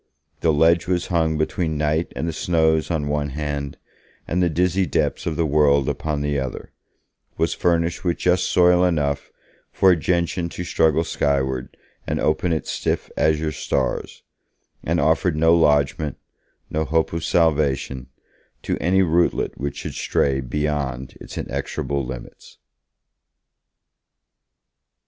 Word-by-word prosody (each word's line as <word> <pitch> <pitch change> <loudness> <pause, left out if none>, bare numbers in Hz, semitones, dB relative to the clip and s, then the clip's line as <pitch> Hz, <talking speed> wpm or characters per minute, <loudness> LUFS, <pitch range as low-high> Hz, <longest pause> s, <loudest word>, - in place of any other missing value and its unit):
The 80 - +2
ledge 80 +3 +3
was 90 -1 0
hung 80 -2 +2
between 80 0 -1
night 75 +2 0
and 80 - -2
the 85 - -2
snows 80 -1 +1
on 80 -4 -1
one 75 0 -1
hand, 70 -1 -4 0.5
and 90 +2 0
the 90 - +3
dizzy 90 +3 +1
depths - - -1
of 80 - -1
the 85 - +1
world 70 -2 +3
upon 75 -2 -2
the 75 -1 0
other; 65 -2 -5 0.7
was 80 0 +1
furnished 85 -1 0
with 85 -2 0
just 90 0 +2
soil 90 0 +4
enough 75 -5 0 0.4
for 95 - +4
a - - +5
gentian 85 +1 -1
to 90 - -6
struggle 80 -2 +2
skywards 65 -5 -1 0.4
and - - -1
open 80 +3 +1
its 80 - -2
stiff - - -2
azure 80 0 +1
stars; 70 -3 -2 0.6
and 85 +2 0
offered 80 +3 +2
no 80 +1 +4
lodgement, 75 -2 +2 0.5
no 80 +1 0
hope 80 +1 0
of 85 -1 -3
salvation, 70 -6 +1 0.6
to - - -2
any 95 +2 +3
rootlet 85 0 +1
which 70 +1 -4
should - - -5
stray 70 -1 0
beyond 70 -1 -3
its - - -9
inexorable 70 -1 -3
limits. 65 -1 -9
80 Hz, 140 wpm, -22 LUFS, 70-85 Hz, 0.7 s, a